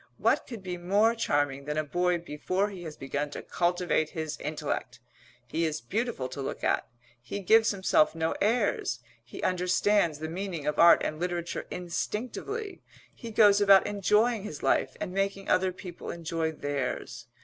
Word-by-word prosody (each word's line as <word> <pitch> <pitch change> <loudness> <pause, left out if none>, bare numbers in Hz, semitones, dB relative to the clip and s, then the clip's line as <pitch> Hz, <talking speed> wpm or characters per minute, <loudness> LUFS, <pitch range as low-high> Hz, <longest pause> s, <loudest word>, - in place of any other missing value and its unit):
What - - +2
could 230 -6 -8
be 180 -1 -4
more 200 +6 +3
charming 145 -10 0
than 150 +1 -3
a 155 - +1
boy 175 +4 +1
before 180 +5 -2
he 190 -3 -8
has 155 -2 -7
begun 145 +2 -3
to - - -7
cultivate 175 -3 0
his 160 -2 -4
intellect? 145 -5 -4 0.5
He 160 +8 -2
is 155 -2 -1
beautiful 210 - -2
to 140 - -6
look - - -5
at; - - +1 0.3
he 125 +11 -5
gives 220 +4 +5
himself 190 -6 +2
no 160 0 0
airs; 205 - +1 0.2
he 120 - -10
understands 180 -1 +2
the 160 +1 -5
meaning 170 -2 -4
of 150 - -1
art 170 0 +7
and 155 - -3
literature 175 -1 -3
instinctively; 250 - -4 0.3
he 235 - -9
goes 210 -2 +5
about 195 -1 +7
enjoying 210 +3 +2
his 155 -8 -7
life 130 - +1
and 180 - -4
making 195 0 -1
other 185 0 +3
people 180 -1 -9
enjoy 165 -1 -2
theirs. 145 -4 -4
175 Hz, 165 wpm, -28 LUFS, 155-200 Hz, 0.5 s, art